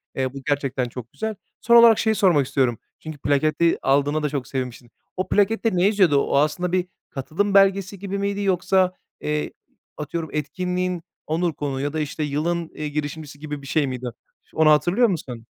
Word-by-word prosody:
Eee, 130 -1 -1
bu 140 - -8
gerçekten 135 -3 0
çok 120 -1 -9
güzel. 220 -1 -4 0.3
Son 235 - +4
olarak 235 -2 +8
şeyi 220 -1 +2
sormak 165 -10 +3
istiyorum. 125 -5 +1 0.2
Çünkü 155 -2 -8
plaketi 155 +4 +2
aldığına 145 +3 +2
da 150 - +1
çok 140 -3 -4
sevinmişsin. 125 -2 -5 0.3
O 185 - -1
plakette 220 +3 +2
ne 180 +1 +3
yazıyordu? 190 -8 +4
O - - 0
aslında 160 +5 +1
bir 180 -1 0 0.2
katılım 175 +9 -2
belgesi 195 0 +3
gibi 200 0 -4
miydi 200 0 -1
yoksa, 185 -1 +2 0.3
eee, 150 0 -2 0.5
atıyorum, 155 +1 -4
etkinliğin 180 +4 -2 0.3
onur 165 +1 0
konuğu 140 -2 -3
ya 145 +1 -2
da 160 - -2
işte 150 +1 -3
yılın, 165 +3 -1
eee, 155 - -4
girişimcisi 145 0 -5
gibi 150 -1 -6
bir 140 - -11
şey 150 -1 +1
miydi? 130 -1 -5 0.4
Ş - - -20
onu 160 -1 +5
hatırlıyor 175 - +4
musun? 125 - -4
155 Hz, 180 wpm, -23 LUFS, 140-185 Hz, 0.5 s, olarak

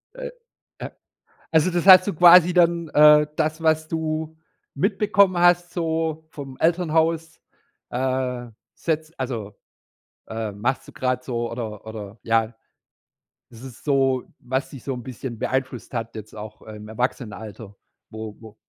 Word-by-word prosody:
Äh, - - -6 0.5
a - - -6 0.6
also 160 +2 +4
das 175 +1 -1
hast 185 0 +9
du 200 - 0
quasi 175 +1 +7
dann, 170 -1 +3
äh, 150 0 +6
das, 155 +1 -1
was 160 -1 +2
du 160 0 -3 0.4
mitbekommen 195 +2 +2
hast, 175 0 +4
so 160 -2 -2
vom 135 -4 -9
Elternhaus, 165 -1 +1 0.5
äh, 130 -1 -2 0.3
setzt 160 0 -3
also, 115 -6 -4 0.7
ähm, 110 -2 -5
machst 130 +4 -1
du - - -13
grade 125 -1 -1
so 120 -2 -3
oder 110 -3 -6
oder, 110 -1 -8
ja 115 0 +1 0.9
es 115 - -14
ist 130 -3 -11
so, 135 -3 +2
was 130 +2 -3
dich 135 - -10
so 135 - -3
'n 125 -1 -7
bisschen 125 -2 -7
beeinflusst 130 -2 -3
hat 115 -2 -4
jetzt 110 -1 -9
auch 105 0 -9
im 105 -1 -10
Erwachsenenalter, 110 -3 -5 0.3
wo 110 -1 -7
wo 110 -2 -13
135 Hz, 140 wpm, -23 LUFS, 115-165 Hz, 0.9 s, hast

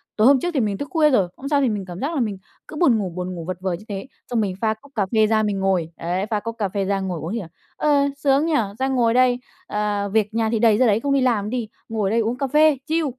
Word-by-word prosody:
tối 215 +2 +4
hôm 275 -1 +6
trước 350 +6 -2
thì 285 - +1
mình 210 -4 0
tức 285 - -5
khuya 315 -2 +4
rồi, 210 -10 +3
hôm 275 - -7
sau 285 -2 +3
thì 265 - +2
mình 205 -3 -3
cảm 175 -1 -8
giác 290 +8 -2
là - - 0
mình 210 -4 -2 0.3
cứ - - -9
buồn 300 -8 +4
ngủ, 200 -3 -2
buồn 180 +1 -5
ngủ 165 -2 -6
vật 185 0 -4
vờ 190 -1 -1
như 180 +5 -7
thế. 195 +3 -5 0.2
Xong 235 -2 +1
mình 195 -3 -2
pha 220 -1 +2
cốc 245 +6 -18
cà 205 -4 +1
phê 220 -1 +4
ra 215 0 +2
mình 205 -2 -1
ngồi, 185 -4 0
đấy, 180 +3 -2
pha 215 - 0
cốc 230 +2 -6
cà 205 -3 -1
phê 195 +1 -2
ra 195 0 0
ngồi 185 -3 -3
uống 165 +6 -5
thì, 230 - -1
à, 190 - -7 0.3
"Ờ, 300 - +1 0.3
sướng 280 +1 +2
nhỉ? 330 - 0 0.3
Ra 265 - +1
ngồi 245 -4 +2
đây, 250 0 +3 0.3
ờ, 205 -1 -1
việc 215 -1 +1
nhà 225 -1 +1
thì 225 -1 0
đầy 220 -2 +4
ra 255 - +4
đấy, 210 -1 +3
không 280 +3 0
đi 275 - +3
làm 225 -5 +1
đi, 240 -2 -2 0.2
ngồi 215 -3 -1
đây 225 +3 +2
uống 230 +2 -1
cà 275 0 -1
phê, 300 +1 +4
chill." 320 0 +1
220 Hz, 305 wpm, -22 LUFS, 195-260 Hz, 0.3 s, hôm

